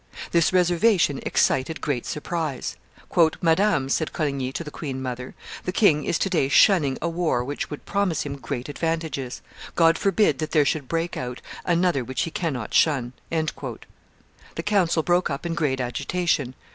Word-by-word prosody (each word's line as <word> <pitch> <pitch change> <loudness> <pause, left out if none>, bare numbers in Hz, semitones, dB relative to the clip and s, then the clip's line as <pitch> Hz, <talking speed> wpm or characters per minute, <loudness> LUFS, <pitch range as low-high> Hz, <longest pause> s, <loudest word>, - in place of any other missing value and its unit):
This 170 -1 +3
reservation 180 -3 +3
excited 135 +5 +1
great 135 -5 -2
surprise. 150 -3 -3 0.6
"Madam," 165 -4 +2
said 155 +3 -1
Coligny 140 -4 -1
to 170 - -3
the 150 - -8
queen 135 -4 -5
mother, 125 -1 -5 0.3
"the 180 - -1
king 170 -7 +3
is 165 - +1
to - - 0
day 165 -8 +1
shunning 145 -3 +5
a - - +1
war 165 -7 0
which 145 +3 -4
would 150 - -8
promise 200 -6 0
him 140 -1 -5
great 125 0 -5
advantages; 155 -4 -3 0.3
God 165 -1 +4
forbid 195 -7 +2
that 155 - -3
there 150 -3 +5
should 140 -2 -1
break 165 +3 -2
out 125 0 -5 0.3
another 170 -5 +2
which 130 +1 -2
he 165 - -4
cannot 140 -10 -3
shun!" 130 -6 +2 0.2
The 160 -1 -7
council 180 -6 +2
broke 175 +2 +2
up 140 +3 -4
in 170 - -1
great 150 -6 0
agitation. 130 +2 -1
155 Hz, 160 wpm, -24 LUFS, 135-170 Hz, 0.6 s, shunning